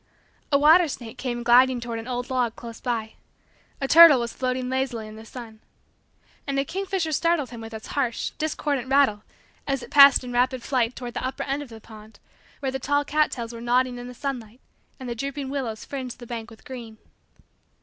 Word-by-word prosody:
A 280 - +5
water 320 +4 +6
snake 235 -5 -8
came 240 -2 -3
gliding 250 +1 +5
toward 235 -1 -5
an 225 - -8
old 250 +1 -4
log 245 -3 0
close 230 -1 -10
by. 225 -3 -2 0.7
A 270 - -1
turtle 320 -3 +9
was 235 -1 -3
floating 255 0 -2
lazily 260 -4 -2
in 215 - -10
the 220 - -11
sun. 225 -3 -10 0.9
And 275 -1 -1
a 275 - +1
kingfisher 380 -1 -2
startled 310 -4 +1
him 235 -2 -8
with 225 0 -8
its 220 -1 -8
harsh, 250 -5 -1
discordant, 290 -4 -1
rattle 265 -6 +3 0.5
as 275 -2 -1
it - - -11
passed 280 -2 +8
in 245 -1 -6
rapid 250 0 +1
flight 250 -3 0
toward 245 -2 -7
the - - -4
upper 260 +1 -3
end 275 +1 -2
of 290 - -9
the 225 -1 -11
pond 220 0 -14 0.4
where 270 -2 -1
the 265 - -3
tall 285 +2 0
cat 305 +1 +2
tails 235 -1 -6
were 230 - -8
nodding 245 +1 +1
in 245 - -7
the 250 - -10
sunlight 245 -4 -5 0.4
and 260 - -7
the 240 - -2
drooping 275 +3 -4
willows 245 -6 -4
fringed 260 -3 -6
the 240 - -11
bank 235 -1 -6
with 225 -2 -16
green. 235 -4 -9
255 Hz, 205 wpm, -25 LUFS, 235-275 Hz, 0.9 s, turtle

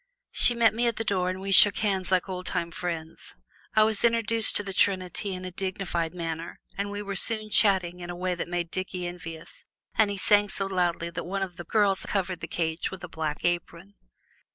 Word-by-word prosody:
She 240 - +4
met 230 -2 +4
me 240 +2 0
at 235 - 0
the 225 - -3
door, 185 -4 0
and 185 0 -4
we 195 +1 -4
shook 200 +2 +8
hands 195 -4 -1
like 185 0 +2
old 185 -1 -4
time 170 0 -2
friends. 165 -2 -6 0.4
I 215 - +6
was 215 -1 +1
introduced 230 -1 +3
to 205 - +5
the 195 -1 -5
trinity 190 0 0
in 185 0 -7
a 185 - -5
dignified 180 -3 -3
manner, 165 -1 -5 0.2
and 200 +1 -3
we 205 0 -5
were 200 -1 -5
soon 215 +1 +1
chatting 185 -5 +4
in 175 0 -8
a 175 - -5
way 180 +1 -2
that 175 - -4
made 175 -1 -3
Dickie 185 -1 -4
envious, 175 - -8 0.3
and 220 -2 +3
he 200 - -3
sang 205 +1 +3
so 195 - -3
loudly 175 -3 -1
that - - -5
one 195 +2 -3
of 180 -2 -6
the 175 - -8
girls 200 0 +2
covered 185 -3 -1
the 165 - -6
cage 160 0 -2
with 190 -1 -9
a - - -5
black 155 -3 -4
apron. 175 +2 -3
185 Hz, 220 wpm, -27 LUFS, 175-205 Hz, 0.4 s, shook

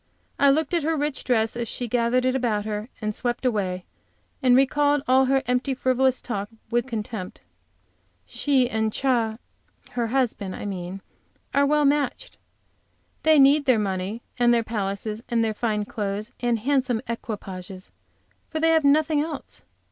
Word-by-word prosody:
I 280 - +6
looked 310 +4 +1
at 340 - +2
her 320 +2 0
rich 295 -1 -2
dress 225 -3 +1
as 235 -1 -3
she 245 +2 -3
gathered 245 +2 +1
it 255 0 +2
about 225 -5 0
her 215 +2 -4
and 215 0 -1
swept 240 +3 -2
away, 190 -6 -1 0.6
and 250 -1 +5
recalled 285 +2 +3
all 260 +1 +5
her 270 +1 +2
empty, 250 +2 0
frivolous 260 0 +1
talk 205 -4 -3 0.2
with 240 +1 +1
contempt. 215 -5 -5 0.8
She 270 -4 +1
and 220 -2 -1
Ch, - - -6
her 230 -4 +1 0.7
husband, 225 -6 -1
I - - -7
mean, 190 -1 -5 0.5
are 280 0 +4
well 300 0 +3
matched. 295 - 0 0.8
They 315 -1 +5
need 285 +1 +6
their 255 -4 +4
money, 195 +2 -2 0.2
and 240 0 +5
their 235 -1 +3
palaces 210 0 -3
and 230 -1 +2
their 220 - -1
fine 210 -2 -1
clothes 210 +1 -4
and 240 -1 +1
handsome 255 -1 0
equipages, 190 -5 -6 0.6
for 315 - -3
they 325 +1 +3
have 320 -1 +3
nothing 295 +1 +3
else. 305 -2 -6
240 Hz, 160 wpm, -24 LUFS, 215-275 Hz, 0.8 s, I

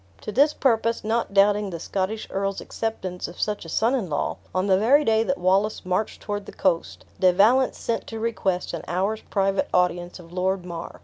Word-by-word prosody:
To - - -5
this 285 +7 +4
purpose, 230 -4 +1
not 225 0 0
doubting 205 +1 +3
the 170 -3 -6
Scottish's 195 +5 -3
earl 195 0 -1
acceptance 190 -5 -4
of 175 - -11
such 210 -4 -2
a - - -8
son 225 +9 +2
in 230 -10 -1
law, 145 - -1
on 185 +1 0
the 190 -1 +3
very 280 +8 +4
day 220 0 +3
that 275 +5 0
Wallace 195 +4 +1
marched 185 +4 -2
toward 205 -1 -4
the - - -7
coast, 175 -3 -1
De 185 -1 +5
Valence 230 +8 +4
sent 230 - -3
to 225 - -6
request 195 -6 -1
an 170 - -3
hour's 195 +5 -1
private 195 -1 0
audience 175 -1 +1
of 175 -1 -14
Lord 185 0 -1
Mar. 170 -1 -7
195 Hz, 200 wpm, -24 LUFS, 180-220 Hz, -, De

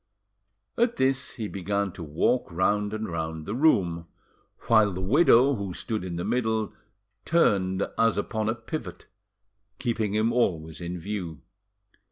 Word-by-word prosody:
At 235 0 +2
this 135 +1 +1
he 110 -4 -4
began 100 0 -2
to 90 - -10
walk 85 +9 0
round 105 +4 +1
and 110 0 -3
round 80 -2 -4
the 100 - -4
room, 95 - +2 0.5
while 110 -3 +4
the 90 - -5
widow, 135 - +5
who 100 -7 -4
stood 110 -4 -3
in 90 -2 -5
the 85 - -3
middle, 110 -3 0 0.5
turned 95 - +2
as 115 -1 +3
upon 110 +1 -1
a 110 - 0
pivot, 115 - -7 0.7
keeping 115 -4 -1
him 110 +2 +2
always 80 -9 0
in 85 +1 -4
view. 90 -4 -5
105 Hz, 145 wpm, -26 LUFS, 90-115 Hz, 0.7 s, widow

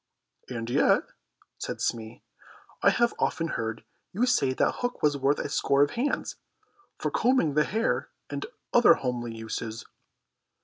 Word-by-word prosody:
"And 115 -2 -4
yet," 120 - +3 0.6
said - - -4
Smee, 115 0 -3 0.6
"I - - +6
have 235 0 +2
often 165 -1 0
heard 110 -3 -3 0.3
you 225 +7 +2
say 245 - +2
that - - +1
hook 245 0 -3
was 150 -1 +4
worth 140 +1 +2
a - - -2
score 140 0 +3
of 145 - 0
hands, 255 +5 -2 0.6
for - - -2
combing 235 - +2
the 150 +1 +3
hair 225 +2 -1 0.2
and 405 - -5 0.3
other 240 - +7
homely 120 -3 -3
uses." 110 0 -5
140 Hz, 145 wpm, -27 LUFS, -, 0.6 s, other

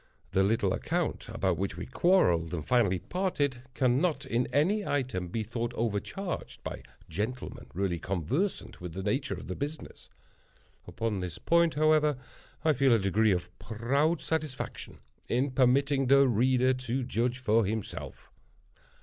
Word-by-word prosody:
The 95 - +3
little 100 -1 +2
account, 170 - -2
about 95 -6 0
which 95 -3 -2
we 90 - -5
quarreled 90 - +2
and 80 -3 -5
finally 100 -3 +3
parted, 145 - -1
cannot, 140 +3 +1
in 120 -1 0
any 185 +10 +2
item, 130 - -1
be 110 +5 -2
thought 115 +2 -3
overcharged, 115 - -3
by - - -5 0.3
gentlemen 120 +6 -4
really 90 -2 -1
conversant 110 - -2
with 90 -2 -6
the 95 - -4
nature 105 +2 -1
of 90 - -9
the 90 - -4
business. 145 +2 -6 0.8
Upon 110 -3 -2
this 90 -4 -5
point, 170 -1 +3
however, 155 -1 +3 0.5
I 155 - +5
feel 135 -2 +4
a - - +4
degree 105 +2 +2
of 90 -1 -2
proud 140 +9 0
satisfaction 155 -4 -4 0.3
in 130 +3 +1
permitting 135 +1 +3
the 140 +1 +6
reader 130 +2 +3
to 130 0 -2
judge 120 +1 0
for 115 -3 +2
himself. 110 +1 -5
125 Hz, 145 wpm, -29 LUFS, 100-145 Hz, 0.8 s, the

